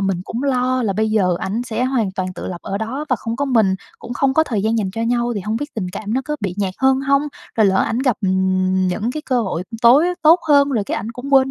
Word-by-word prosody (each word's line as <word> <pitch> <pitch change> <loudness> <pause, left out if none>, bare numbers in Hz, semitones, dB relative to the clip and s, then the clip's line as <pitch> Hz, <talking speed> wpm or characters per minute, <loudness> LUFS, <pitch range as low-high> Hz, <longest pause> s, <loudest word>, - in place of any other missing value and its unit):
mình 195 -2 0
cũng 235 +4 -4
lo 255 -1 +1
là 205 -4 0
bây 215 +2 0
giờ 185 -5 +2
ảnh 215 +5 -2
sẽ 245 0 -2
hoàn 245 -7 0
toàn 185 -1 -3
tự - - -6
lập 175 -2 -6
ở 195 - -3
đó 255 +7 -4
và 255 - +2
không 230 +2 -4
có 285 - 0
mình, 225 -8 +2 0.2
cũng 240 - -8
không 265 +2 +1
có 315 - +4
thời 215 -9 -2
gian 225 +1 +1
dành 195 -3 -1
cho 225 +4 -4
nhau 240 +1 0
thì 205 - -2
hông 215 +4 -2
biết 290 +4 -6
tình 190 -5 -3
cảm 215 +1 -4
nó 260 - +1
có 300 0 -3
bị 195 -4 -3
nhạt 190 -2 -1
hơn 265 0 +3
hông, 275 0 +2 0.4
rồi 215 -2 +5
lỡ 190 - +2
ảnh 230 - -1
gặp, 255 -4 +1
ừm, 185 0 +1
những 205 +6 -1
cái 305 - -5
cơ 255 -2 +1
hội 185 -3 -3 0.2
tối 265 +8 +6
á 360 - -1
tốt 330 +3 +6
hơn 285 -1 +5
rồi 230 -7 0
cái - - -3
ảnh 220 +3 -4
cũng 275 +4 -2
quên 265 0 +5
230 Hz, 285 wpm, -19 LUFS, 195-265 Hz, 0.4 s, tối